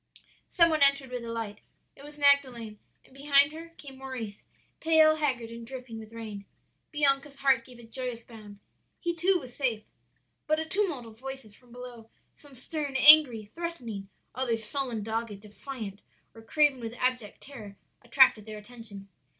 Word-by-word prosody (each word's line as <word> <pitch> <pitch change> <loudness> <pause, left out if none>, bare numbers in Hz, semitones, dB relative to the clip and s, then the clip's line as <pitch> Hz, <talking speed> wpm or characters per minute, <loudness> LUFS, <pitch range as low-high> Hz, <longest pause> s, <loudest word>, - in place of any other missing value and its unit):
"Some 335 -2 +5
one 310 -1 0
entered 275 -2 +3
with 250 -1 -5
a 230 - -6
light. 225 -3 -5 0.3
It 275 - -15
was 295 +1 -12
Magdalen, 260 -7 +2 0.3
and - - -22
behind 280 +1 +4
her 325 +2 -10
came 270 -2 -12
Maurice, 245 -6 -7 0.4
pale, 315 -1 +4
haggard, 255 -7 -2
and 230 0 -9
dripping 250 -2 -8
with 220 0 -12
rain. 215 -3 -8 0.5
"Bianca's 280 -1 0
heart 270 -4 +2
gave 250 0 -15
a 240 - -14
joyous 235 0 -4
bound. 215 -3 -13 0.4
He 345 -1 -2
too 360 +3 +3
was 255 -5 -12
safe. 235 -6 -1 0.6
"But 310 0 +1
a 320 - -3
tumult 330 - -1
of 225 0 -14
voices 265 -5 -8
from 245 +3 -22
below 245 -2 -11 0.2
some 285 -2 -18
stern, 285 +2 -4
angry, 265 -7 +8
threatening, 240 - -6 0.2
others 235 -3 -1
sullen, 240 -2 -2
dogged, 220 -1 -4
defiant, 210 0 -9 0.3
or 225 - -13
craven 290 +3 +2
with 230 0 -6
abject 250 -4 -2
terror 215 -8 -11 0.3
attracted 235 -3 +4
their 215 -1 -7
attention. 210 -3 -11
250 Hz, 165 wpm, -28 LUFS, 225-280 Hz, 0.6 s, angry